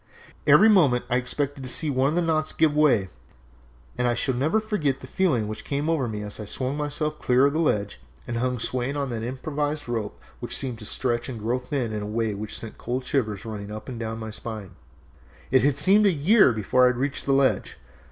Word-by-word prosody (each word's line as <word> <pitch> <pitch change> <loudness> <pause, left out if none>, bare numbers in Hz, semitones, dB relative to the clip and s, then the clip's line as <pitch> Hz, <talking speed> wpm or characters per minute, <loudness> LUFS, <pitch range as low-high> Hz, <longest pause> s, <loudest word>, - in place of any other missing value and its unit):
Every 220 - +7
moment 150 - +4
I 125 - +3
expected 135 +1 -3 0.2
one 130 +2 +2
of 155 - -2
the 175 - +2
knots 155 -1 0
to - - -21
give 155 -2 +3
way, 130 -11 +3 0.9
and 125 - +2
I 120 - +1
shall 130 +2 0
never 155 - +1
forget 170 -12 -1
the - - -10
feeling 130 - +1
which 110 0 -6
came 145 +3 -1
over 145 -6 0
me 105 -2 -4
as 105 +1 -7
I 105 - -5
swung 130 +6 -2
myself 150 +1 -2
clear 125 +2 +3
of 140 - +2
the 155 - 0
ledge 105 - 0 0.3
and 120 - -3
hung 125 +1 0
swaying 125 +4 -2
on 140 -3 -2
that 115 -2 -3
improvised 145 +4 -3
rope 115 -4 -3 0.2
which - - -3
seemed 125 -5 -4
to 105 - -9
stretch 120 +1 -1
and 125 - -5
grow 115 +4 -1
thin 125 -3 -3
in 105 - -3
a 105 - -4
way 110 0 -1
which 105 +1 -5
sent 115 - -8
cold 125 +2 -3
shivers 110 -8 -1
running 105 -2 -6
up 110 0 -8
and 125 -3 -6
down 110 -1 -4
my 110 -1 -6
spine. 105 -3 -7 0.8
It 135 +2 +3
seemed 200 +8 +5
a - - +5
year 175 - +5
before 115 +4 +2
I - - +5
reached 130 +4 -2
the 135 - +3
ledge. 135 -1 +1
130 Hz, 220 wpm, -25 LUFS, 115-145 Hz, 0.9 s, Every